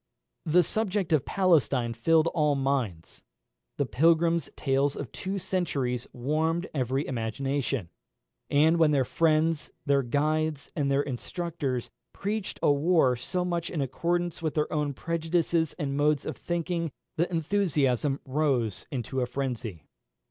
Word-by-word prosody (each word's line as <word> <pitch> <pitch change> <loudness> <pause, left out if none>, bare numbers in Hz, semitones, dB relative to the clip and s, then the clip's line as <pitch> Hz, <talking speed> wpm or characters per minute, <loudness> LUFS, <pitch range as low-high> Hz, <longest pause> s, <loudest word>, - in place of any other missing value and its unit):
The 175 +3 +5
subject 200 -3 -1
of 150 - +3
Palestine 145 -10 +2
filled 155 +8 +3
all 150 -3 +2
minds; 130 -12 -2 0.6
the 140 - +1
pilgrims' 165 +3 +3
tales 135 0 +1
of 140 - -6
two 195 +1 -4
centuries 140 -10 -1
warmed 160 +7 0
every 135 0 0
imagination; 135 -1 -2 0.6
and 155 +4 +4
when 160 -2 +5
their 140 -3 +2
friends, 160 +1 +1 0.2
their 140 -1 +3
guides, 150 +3 0
and 145 -3 0
their 140 +1 +2
instructors 140 -1 -3 0.2
preached 205 0 -3
a - - +5
war 145 -3 +3
so 180 +9 -2
much 170 -1 -2
in 165 - -3
accordance 170 +6 -1
with 155 -2 -2
their 150 -1 0
own 150 -2 -1
prejudices 165 +1 0
and 140 -5 -2
modes 145 0 +2
of - - -3
thinking, 170 -1 -2 0.3
the 170 +2 +1
enthusiasm 155 - +1
rose 130 -7 0
into 130 0 -3
a 125 - 0
frenzy. 120 - -4
150 Hz, 135 wpm, -28 LUFS, 135-170 Hz, 0.6 s, The